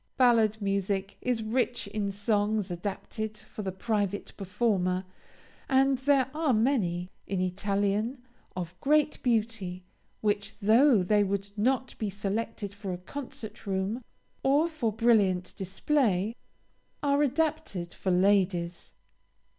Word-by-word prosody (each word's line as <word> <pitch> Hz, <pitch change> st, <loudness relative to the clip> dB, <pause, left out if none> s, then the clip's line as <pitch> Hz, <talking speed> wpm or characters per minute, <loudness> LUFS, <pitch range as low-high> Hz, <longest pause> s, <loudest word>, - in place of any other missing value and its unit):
Ballad 225 Hz, -4 st, +4 dB
music 195 Hz, 0 st, -1 dB
is 245 Hz, -3 st, 0 dB
rich 240 Hz, +2 st, 0 dB
in 200 Hz, 0 st, -2 dB
songs 205 Hz, -1 st, 0 dB
adapted 210 Hz, +4 st, -4 dB
for -, -, -9 dB
the 195 Hz, -2 st, -3 dB
private 205 Hz, 0 st, -2 dB
performer 190 Hz, -2 st, 0 dB, 0.6 s
and 270 Hz, 0 st, +4 dB
there 265 Hz, -1 st, +3 dB
are 305 Hz, -3 st, +1 dB
many, 215 Hz, -7 st, +1 dB, 0.2 s
in 195 Hz, -1 st, -1 dB
Italian, 200 Hz, +5 st, 0 dB, 0.4 s
of 175 Hz, -2 st, -4 dB
great 300 Hz, +1 st, +2 dB
beauty, 215 Hz, -6 st, -1 dB, 0.4 s
which, 205 Hz, 0 st, 0 dB
though 225 Hz, +1 st, +5 dB
they 205 Hz, +3 st, +3 dB
would 200 Hz, 0 st, -2 dB
not 260 Hz, +4 st, 0 dB
be 215 Hz, -, -1 dB
selected 205 Hz, +1 st, -3 dB
for 200 Hz, -2 st, -5 dB
a 180 Hz, -, -3 dB
concert 220 Hz, +1 st, -8 dB
room, 195 Hz, +5 st, -1 dB, 0.4 s
or 285 Hz, +5 st, +3 dB
for 300 Hz, -9 st, -1 dB
brilliant 205 Hz, -5 st, +2 dB
display, 205 Hz, +1 st, 0 dB, 0.7 s
are 285 Hz, 0 st, +3 dB
adapted 295 Hz, -, 0 dB
for 190 Hz, -, -3 dB
ladies. 180 Hz, -2 st, +2 dB
210 Hz, 120 wpm, -29 LUFS, 195-245 Hz, 0.7 s, though